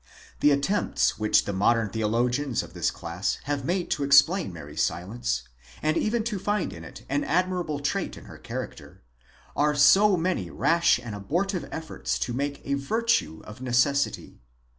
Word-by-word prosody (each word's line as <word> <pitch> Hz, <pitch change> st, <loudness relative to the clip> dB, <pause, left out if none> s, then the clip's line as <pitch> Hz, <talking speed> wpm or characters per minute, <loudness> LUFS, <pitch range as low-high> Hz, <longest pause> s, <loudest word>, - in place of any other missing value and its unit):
'The 150 Hz, -, +5 dB
attempts 145 Hz, -, +1 dB
which 105 Hz, 0 st, +3 dB
the 100 Hz, -, -3 dB
modern 110 Hz, +3 st, +2 dB
theologians 120 Hz, +5 st, 0 dB
of -, -, -12 dB
this -, -, 0 dB
class 85 Hz, +3 st, -3 dB
have 140 Hz, -1 st, -2 dB
made 175 Hz, +5 st, -1 dB
to 145 Hz, -, 0 dB
explain 140 Hz, -, +4 dB
Mary's 80 Hz, -4 st, -6 dB
silence, -, -, -2 dB, 0.4 s
and 155 Hz, +1 st, 0 dB
even 225 Hz, +4 st, 0 dB
to 215 Hz, -3 st, -3 dB
find 205 Hz, 0 st, -1 dB
in -, -, -10 dB
it -, -, -11 dB
an 145 Hz, +2 st, 0 dB
admirable 175 Hz, -2 st, 0 dB
trait 145 Hz, 0 st, -2 dB
in -, -, -12 dB
her -, -, -12 dB
character, -, -, -8 dB, 0.5 s
are 150 Hz, 0 st, +2 dB
so 190 Hz, +7 st, +6 dB
many 180 Hz, +2 st, -1 dB
rash 170 Hz, 0 st, +3 dB
and 120 Hz, -3 st, -7 dB
abortive 175 Hz, -, -2 dB
efforts 160 Hz, -1 st, -3 dB
to 120 Hz, -, -3 dB
make 140 Hz, +2 st, -3 dB
a 140 Hz, -, -1 dB
virtue 220 Hz, -, 0 dB
of 105 Hz, +4 st, -11 dB
necessity. 130 Hz, +3 st, 0 dB
145 Hz, 160 wpm, -26 LUFS, 120-180 Hz, 0.5 s, so